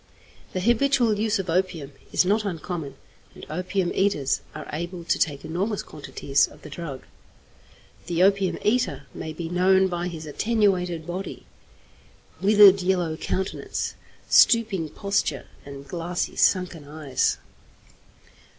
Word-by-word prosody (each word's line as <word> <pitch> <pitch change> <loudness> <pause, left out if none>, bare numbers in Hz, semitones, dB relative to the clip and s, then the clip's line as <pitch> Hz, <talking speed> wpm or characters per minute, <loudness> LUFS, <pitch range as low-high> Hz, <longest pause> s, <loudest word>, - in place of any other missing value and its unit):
The 185 - -2
habitual 240 0 +3
use 220 0 +1
of 190 -1 -4
opium 165 -4 -1 0.2
is - - +3
not 210 +3 +2
uncommon, 165 -5 -4 0.4
and - - -10
opium 180 +2 -1
eaters 190 -9 +1
are - - -7
able 170 +3 -5
to - - 0
take 145 -4 -1
enormous 195 +6 -2
quantities 140 -2 0
of - - -17
the - - -10
drug. 150 -6 -6 1.0
The 175 0 +2
opium 195 -1 +3
eater 210 - +1
may 160 - -6
be 165 +1 -5
known 190 +2 +3
by 175 0 -2
his 160 -3 -7
attenuated 180 -2 0
body, 180 +3 -6 1.0
withered 200 -1 +7
yellow 180 -3 0
countenance, 190 +3 -3 0.3
stooping 215 -9 +4
posture, 175 -8 -1 0.2
and 140 0 -9
glassy, 175 0 -3
sunken 180 -6 +1
eyes. 145 -3 0
180 Hz, 125 wpm, -25 LUFS, 160-200 Hz, 1.0 s, withered